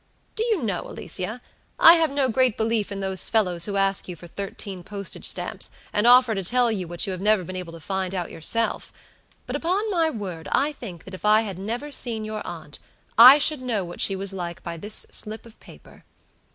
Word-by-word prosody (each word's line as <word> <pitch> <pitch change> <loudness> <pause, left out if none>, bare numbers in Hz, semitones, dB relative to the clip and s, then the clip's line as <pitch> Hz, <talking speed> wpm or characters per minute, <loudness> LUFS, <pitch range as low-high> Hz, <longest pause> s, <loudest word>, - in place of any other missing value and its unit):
Do 445 - -1
you 440 - 0
know, 200 -6 -3
Alicia, 190 +8 -5 0.3
I 330 - +9
have 325 -2 +2
no 275 -1 0
great 255 -1 +1
belief 220 -2 -1
in 195 0 -5
those 190 -1 0
fellows 180 -6 +1
who 200 - -3
ask 195 0 +1
you 180 - -6
for 170 - -13
thirteen 195 +1 -6
postage 200 0 -4
stamps, - - -1 0.2
and 210 +3 +2
offer 250 -1 +6
to 195 -2 -3
tell 240 +4 +3
you 190 -5 -3
what 170 0 0
you 195 - -3
have 185 -1 -6
never 210 -2 +2
been 185 +2 -8
able 180 -2 -7
to 165 - -10
find 190 +2 -3
out 180 -2 -4
yourself; 225 +8 -1 0.5
but - - -5
upon 375 +6 -1
my 330 -4 +2
word 190 - -6
I 285 +3 +2
think 180 - -10
that 190 - -12
if 185 - -10
I 215 +1 +5
had 195 -5 -6
never 235 +9 -5
seen 230 -5 -1
your 215 0 -5
aunt, 160 -4 -8 0.4
I 250 +5 +10
should 300 -1 +3
know 225 -7 -2
what 175 - -7
she 195 - +3
was 195 0 -3
like 175 -1 -6
by 170 -1 -5
this 210 +6 +1
slip 215 +2 -2
of 230 -1 -17
paper. - - -17
205 Hz, 220 wpm, -24 LUFS, 185-240 Hz, 0.5 s, I